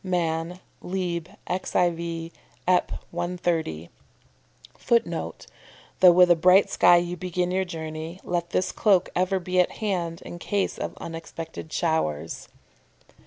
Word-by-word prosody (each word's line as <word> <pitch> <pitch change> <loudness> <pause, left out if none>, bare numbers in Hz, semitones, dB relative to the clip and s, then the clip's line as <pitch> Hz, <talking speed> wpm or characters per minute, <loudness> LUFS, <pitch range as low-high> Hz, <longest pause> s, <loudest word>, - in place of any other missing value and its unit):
Man'., 170 -1 -1 0.2
lib. 175 -2 -3 0.2
xiv. 170 -2 -1 0.4
Ep. 180 -1 +3 0.2
130. 170 - -2 0.9
[Footnote: 235 -1 -1 0.5
"Though 180 -1 +9
with 180 0 +6
a - - +7
bright 180 +4 +5
sky 175 - +6
you 175 0 -1
begin 180 0 -2
your 190 +1 +1
journey, 160 0 -6
let 175 -1 -2
this 185 - 0
cloak 195 -4 +2
ever 185 +2 +1
be 185 0 -1
at 180 - +3
hand 175 -6 -3
in 175 - -8
case 200 +2 -1
of - - -4
unexpected 165 -1 -7
showers." 80 - -1
175 Hz, 120 wpm, -25 LUFS, 165-180 Hz, 0.9 s, Though